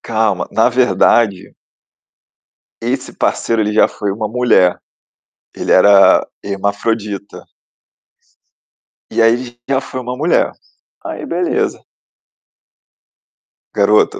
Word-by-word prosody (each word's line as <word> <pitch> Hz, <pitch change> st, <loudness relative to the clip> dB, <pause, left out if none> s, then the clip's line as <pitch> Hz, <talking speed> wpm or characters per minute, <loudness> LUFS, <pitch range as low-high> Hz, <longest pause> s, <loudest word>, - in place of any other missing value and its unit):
Calma, 110 Hz, -5 st, -1 dB
na 115 Hz, +2 st, +3 dB
verdade 120 Hz, -5 st, +2 dB, 1.3 s
esse -, -, -3 dB
parceiro 115 Hz, -1 st, 0 dB
ele 105 Hz, 0 st, -1 dB
já 110 Hz, -, +4 dB
foi 105 Hz, -, -4 dB
uma 105 Hz, +1 st, -4 dB
mulher, 115 Hz, -6 st, +2 dB, 0.8 s
ele -, -, -3 dB
era 100 Hz, +1 st, +5 dB, 0.2 s
hermafrodita. 100 Hz, +1 st, -3 dB, 1.7 s
E -, -, +1 dB
aí, 115 Hz, 0 st, +5 dB
ele 120 Hz, 0 st, -7 dB
já 135 Hz, -1 st, +1 dB
foi 130 Hz, -1 st, -7 dB
uma 125 Hz, 0 st, -5 dB
mulher. 155 Hz, +6 st, +1 dB, 0.6 s
Aí -, -, -6 dB
beleza. 355 Hz, -, -1 dB, 2.0 s
Garota, 425 Hz, -1 st, +2 dB
115 Hz, 95 wpm, -16 LUFS, 100-125 Hz, 2.0 s, era